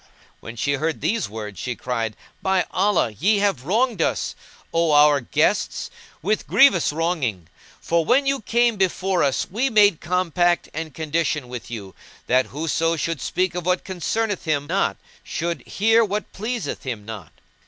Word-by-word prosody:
When 115 - -9
she 140 +5 0
heard 155 +3 -1
these 225 - -1
words 105 -3 -7
she 125 +5 -3
cried, 115 -4 -3 0.3
"By 190 -1 +1
Allah, 190 - +2
ye 200 - +2
have 200 -11 0
wronged 220 - +1
us, - - 0 0.4
O 165 -2 +2
our 145 -1 +6
guests. 120 - 0 0.3
with 210 +4 0
grievous 200 - +5
wronging; 145 - -1 0.3
for 170 0 +1
when 260 - +3
you 275 -2 0
came 235 +1 +2
before 190 -1 +1
us 135 -2 +1
we 245 +7 +1
made 205 -7 +4
compact 175 0 +1
and 160 +1 -4
condition 155 -2 -1
with 125 -3 -7
you, 100 -5 -7 0.3
that 130 +1 +2
whoso 165 +3 0
should 165 -2 -2
speak 185 -1 0
of 180 -1 -4
what 180 0 +1
concerneth 200 +3 -2
him 145 -3 0
not - - 0 0.3
should 170 +1 -3
hear 225 +3 +3
what 210 0 -3
pleaseth 215 - -4
him 115 -6 -5
not. 105 -7 -8
165 Hz, 160 wpm, -22 LUFS, 140-200 Hz, 0.4 s, our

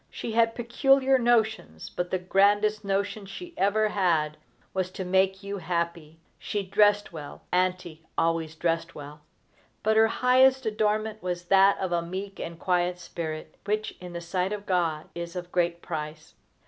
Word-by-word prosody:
She 230 - -5
had 230 0 +3
peculiar 265 +2 +3
notions, 220 - 0
but 180 0 -3
the 185 - 0
grandest 205 +3 +2
notion 200 +1 -2
she 345 - -9
ever 215 +2 +2
had 165 -7 +1 0.4
was 185 -1 -1
to 190 - -5
make 190 +2 +2
you 200 0 -4
happy. 170 -3 -3 0.2
She 205 -1 -3
dressed 205 0 +3
well 150 -3 -9
Auntie 180 -3 -1
always 165 -1 0
dressed 165 0 -1
well; 150 +1 -10 0.6
but 220 +1 +3
her 220 0 +6
highest 260 +2 +4
adornment 215 0 0
was 180 -1 -3
that 195 0 +6
of 190 -2 -3
a 170 -1 +1
meek 190 +3 -6
and 165 0 -6
quiet 180 0 0
spirit, 160 -3 -6
which, 215 +1 -2
in 180 -1 -8
the 170 - -5
sight 180 +2 -1
of 205 -1 -5
God, 165 -5 0
is 170 +1 -6
of 180 0 -6
great 170 -1 0
price. 155 -1 -6
185 Hz, 160 wpm, -27 LUFS, 170-210 Hz, 0.6 s, her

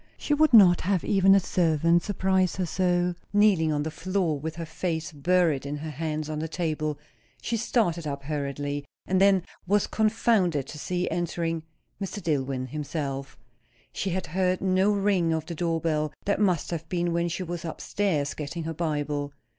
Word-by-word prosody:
She 295 - -1
would 310 +1 +4
not 190 -7 +7
have 190 -1 0
even 195 -1 +5
a - - +6
servant 170 -2 +2
surprise 190 -2 +1
her 185 - -1
so; 180 0 +1 0.2
kneeling 200 -6 +4
on 145 -1 0
the 160 - -3
floor 175 -2 -1
with 160 +2 -5
her 165 0 -5
face 160 0 -3
buried 165 -1 +2
in 145 +1 -4
her 155 +1 -6
hands 155 +1 -3
on 155 -1 -3
the 160 - -2
table. 155 -3 -2 0.4
She 235 - -2
started 195 -8 0
up 140 -1 -4
hurriedly; 145 0 -3 0.2
and 190 0 +1
then 195 -2 +5 0.2
was 205 +2 +3
confounded 215 - +1
to 150 - -8
see 180 +3 -2
entering 165 -1 -1 0.4
Mr. 195 +1 -4
Dillwyn 135 -7 -1
himself. 140 -2 -4 0.6
She 195 - -2
had 185 0 -2
heard 185 +3 0
no 190 +2 +2
ring 195 -5 +2
of 160 -1 -2
the 170 - -5
door 165 0 -1
bell; 155 -2 0
that 200 - +1
must 185 -7 +1
have 165 -1 -4
been 175 -1 0
when 170 0 0
she 180 +3 -3
was 175 -1 -5
up 165 - -6
stairs 160 -9 -1
getting 155 +3 -5
her 165 +1 -3
Bible. 145 -3 -2
170 Hz, 180 wpm, -26 LUFS, 155-185 Hz, 0.6 s, not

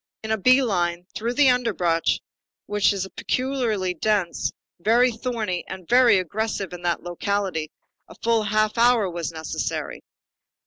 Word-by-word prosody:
In 220 - -4
a 220 - +2
bee 255 +6 +5
line, 175 -5 -1
through 235 +3 -3
the 275 -2 +6
underbrush, 185 -9 +1 0.4
which 205 0 +2
is 195 -1 -2
peculiarly 240 -8 -1
dense, 190 0 0 0.3
very 235 +7 +4
thorny, 225 -6 -3
and 185 -3 -8
very 245 -4 +6
aggressive 195 +1 -2
in 175 - -8
that 175 -1 -1
locality, 175 -2 -2 0.4
a - - -14
full 230 -1 +3
half 215 +1 +1
hour 235 -3 +4
was 170 -1 -4
necessary. 160 -1 -4
210 Hz, 140 wpm, -24 LUFS, 180-235 Hz, 0.4 s, the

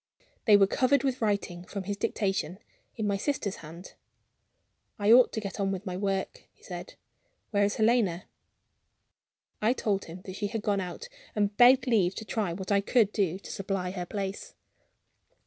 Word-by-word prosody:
They 210 -3 +7
were 200 - +6
covered 255 +7 +2
with 260 -2 -1
writing 200 -5 -1
(from 195 +1 -6
his 200 +2 -3
dictation) 195 -2 -1 0.4
in 220 - -2
my 200 -1 +1
sister's 210 -4 -2
hand. 165 +4 -11 1.0
"I 205 0 +3
ought 245 +1 +7
to 220 - -1
get 200 -1 -6
on 195 -1 +1
with 195 +1 -4
my 180 -2 -4
work," 195 0 -2
he - - -30
said. - - -8 0.6
"Where 205 -1 +3
is 205 - -1
Helena?" 215 -6 +2 1.4
I 220 +3 +3
told 200 -6 -1
him 175 +3 -10
that 185 - -8
she 205 - -1
had 220 0 -4
gone 200 -2 +1
out, 185 - -6 0.3
and 205 -1 0
begged 250 +2 +6
leave 200 -7 +2
to 220 - -6
try 205 -3 -1
what 190 +3 -5
I 200 0 +4
could 210 0 +3
do 190 -4 0
to 200 - -10
supply 195 -2 -3
her 180 -2 -5
place. 195 0 -5
200 Hz, 180 wpm, -28 LUFS, 190-220 Hz, 1.4 s, They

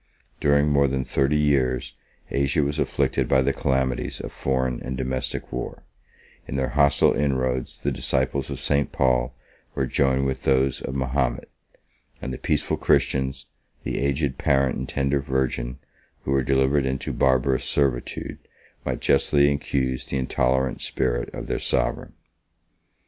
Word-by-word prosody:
During 70 0 +3
more 70 -1 +4
than 65 -1 -1
thirty 70 +3 +1
years, 70 -4 +1 0.4
Asia 70 +2 +1
was 70 +1 -2
afflicted - - 0
by 65 -1 +3
the 70 +1 +1
calamities 65 -2 -1
of - - -6
foreign 65 -2 -1
and 65 0 -4
domestic 65 0 -3
war; 60 - -5 0.6
in - - -5
their 65 -1 0
hostile 70 0 +4
inroads, 65 -3 -1
the - - -2
disciples 65 +1 -1
of - - -5
St. 70 -1 0
Paul 65 -1 +1 0.4
were 65 - 0
joined 65 0 +1
with 65 -1 -2
those 65 -1 +2
of 65 - -5
Mahomet; 65 -2 -1 0.7
and 65 - -5
the - - -6
peaceful - - 0
Christians, 65 -1 +1 0.4
the - - -2
aged 70 0 -1
parent 70 -1 +2
and 65 - -5
tender 70 0 0
virgin, 65 -2 -1 0.5
who - - -3
were 70 0 +3
delivered 65 +1 +2
into 65 0 -3
barbarous 65 0 +2
servitude, 65 -4 -1 0.4
might - - -3
justly 70 +1 +4
accuse 65 -2 -2
the 70 - -2
intolerant 65 0 0
spirit - - -1
of - - -6
their - - -2
sovereign. - - -1
65 Hz, 145 wpm, -24 LUFS, 65-70 Hz, 0.7 s, more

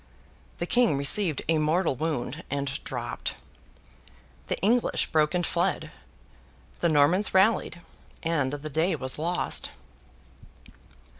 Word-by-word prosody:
The 175 - -2
King 235 - +3
received 155 +3 +1
a 160 0 +3
mortal 155 0 +1
wound, 155 +1 -3
and 140 0 -3
dropped. 120 -2 -4 1.1
The - - -1
English 235 +5 +2
broke 155 +1 +2
and 175 -1 +1
fled. - - -1 0.9
The 170 - +2
Normans 165 +7 +3
rallied, 190 -2 +3 0.4
and 160 -5 0
the 145 +1 -5
day 160 +5 +1
was 130 0 -4
lost. 175 +3 0
160 Hz, 115 wpm, -27 LUFS, 140-180 Hz, 1.1 s, King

